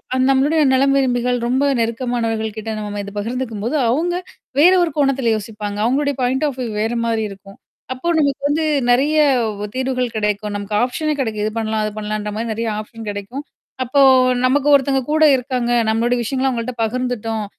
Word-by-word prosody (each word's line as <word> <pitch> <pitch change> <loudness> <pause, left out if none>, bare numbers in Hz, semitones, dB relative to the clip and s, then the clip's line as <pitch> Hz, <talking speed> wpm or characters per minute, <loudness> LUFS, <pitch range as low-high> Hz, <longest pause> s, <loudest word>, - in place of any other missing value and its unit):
அந் 260 0 +2
நம்மளுடைய 290 +4 +2
நலம் 275 +1 +3
விரும்பிகள் 245 -2 +1
ரொம்ப 260 +3 +1 0.2
நெருக்கமானவர்கள் 230 -2 -2
கிட்ட 220 +1 -5
நம்ம 205 -1 -5
இத 200 - -8
பகிர்ந்துக்கும்போது 230 +2 -3
அவங்க 330 +8 0 0.5
வேற 350 +5 +7
ஒரு 335 - -1
கோணத்தில 270 -5 +2
யோசிப்பாங்க. 210 -1 -5
அவங்களுடைய 285 +3 +1
பாயிண்ட் 260 +4 +1
ஆஃப் 270 -3 -5
வியூ 240 - -3
வேற 225 +2 -1
மாரி 225 -1 0
இருக்கும். 195 0 -13 0.4
அப்போ 260 +7 -6
நமக்கு 280 -2 0
வந்து 305 +2 0 0.3
நெறைய 285 +5 +2 0.4
வ் 210 - -4
தீர்வுகள் 255 -2 -1
கிடைக்கும். 210 0 -1
நமக்கு 205 +1 -4
ஆப்ஷனே 300 +5 -1
கிடைக்கும். 220 -5 -2
இது 215 - -1
பண்ணலாம். 220 -1 -1
அது 215 - -3
பண்ணலான்ற 210 0 -3
மாரி 225 +1 -3
நிறைய 230 +1 -3
ஆப்ஷன் 225 0 -9
கிடைக்கும். 205 +8 -6 0.4
அப்போ 255 +3 0 0.5
"நமக்கு 280 +2 +2
ஒருத்தங்க 270 -1 +2
கூட 315 0 +3
இருக்காங்க. 250 -1 -2 0.2
நம்மளுடைய 235 +2 +1
விஷயங்கள்லாம் 260 +3 0
அவங்கள்ட்ட 235 +1 -4
பகிர்ந்துட்டோம். 225 -2 -2
245 Hz, 165 wpm, -19 LUFS, 220-270 Hz, 0.5 s, வேற